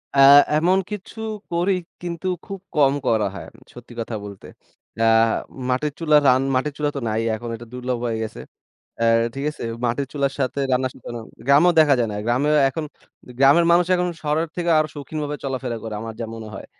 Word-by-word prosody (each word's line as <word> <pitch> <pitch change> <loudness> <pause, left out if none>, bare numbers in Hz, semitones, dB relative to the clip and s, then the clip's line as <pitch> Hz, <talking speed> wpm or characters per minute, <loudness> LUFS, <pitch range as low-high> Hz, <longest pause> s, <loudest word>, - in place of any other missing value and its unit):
অ্যা 140 - +5 0.4
এমন 180 +4 +3
কিছু 210 +2 -7 0.3
করি, 175 +3 +1 0.3
কিন্তু 175 0 -5 0.2
খুব 195 -1 -7 0.2
কম 140 -2 +4
করা 110 -2 +2
হয়। - - -7
উম 115 - -19
সত্যি 120 0 -13
কথা 115 0 -5
বলতে। 100 -2 -10 0.5
আ - - +3 0.7
মাটির 140 +4 0
চুলা 155 -2 +4
রান 130 0 +5
মাটির 140 +3 0
চুলা 150 -1 0
তো - - -2
নাই 110 +1 0
এখন, 120 +2 -7
এটা, 115 +1 -11
দুর্লভ 125 0 -3
হয়ে 115 -2 -1
গেছে। 110 - -7 0.6
অ্যা 115 - +1 0.3
ঠিক 135 +1 -4
আছে? 150 - -8 0.2
মাটির 120 +4 0
চুলার 140 -1 0
সাথে 135 +1 -1
রান্না 130 +1 +2
সুতরাং 120 -2 -8 0.2
গ্রামেও 145 +6 +5
দেখা 150 -3 +5
যায় 115 -2 +1
না, - - -4
গ্রামেও 135 +6 +2
এখন 155 +4 -4 0.4
দে - - -13
গ্রামের 140 +5 +6
মানুষ 175 0 +4
এখন 180 0 0
শহরের 155 +2 -1
থেকে 175 -1 -1
আরও 155 0 +1
সৌখিনভাবে 150 +1 -5
চলাফেরা 130 -3 -3
করে, 110 -1 -5
আমার 115 0 -6
যা 115 - -3
মনে 110 -1 -8
হয়। - - -8
140 Hz, 195 wpm, -22 LUFS, 120-155 Hz, 0.7 s, গ্রামের